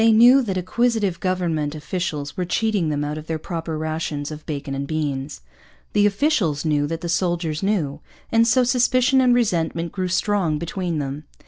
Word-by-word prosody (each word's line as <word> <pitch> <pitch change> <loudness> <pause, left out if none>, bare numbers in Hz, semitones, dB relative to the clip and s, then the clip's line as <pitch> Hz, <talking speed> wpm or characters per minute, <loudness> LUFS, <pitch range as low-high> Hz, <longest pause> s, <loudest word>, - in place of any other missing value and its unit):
They 225 0 +6
knew 240 +5 +7
that 195 -7 -2
acquisitive 205 -1 0
government 165 -5 -1
officials 150 -2 -4
were 185 - -1
cheating 195 -1 0
them 145 -1 -1
out 150 +1 -3
of 155 - -11
their 160 - -1
proper 165 -1 -4
rations 155 -2 -3
of 155 0 -8
bacon 140 -2 -4
and 140 +1 -3
beans. 145 -2 -3 0.5
The 205 0 +4
officials 200 - +1
knew 145 -2 +1
that 165 +1 -4
the 175 - -4
soldiers 170 -3 -1
knew. 170 -9 0 0.3
And 230 0 +4
so 255 +2 +4
suspicion 255 +2 +3
and 250 -1 +4
resentment 170 -7 0
grew 185 -2 -2
strong 185 -3 +1
between 170 +1 -3
them. 145 +1 -4
170 Hz, 180 wpm, -22 LUFS, 150-205 Hz, 0.5 s, knew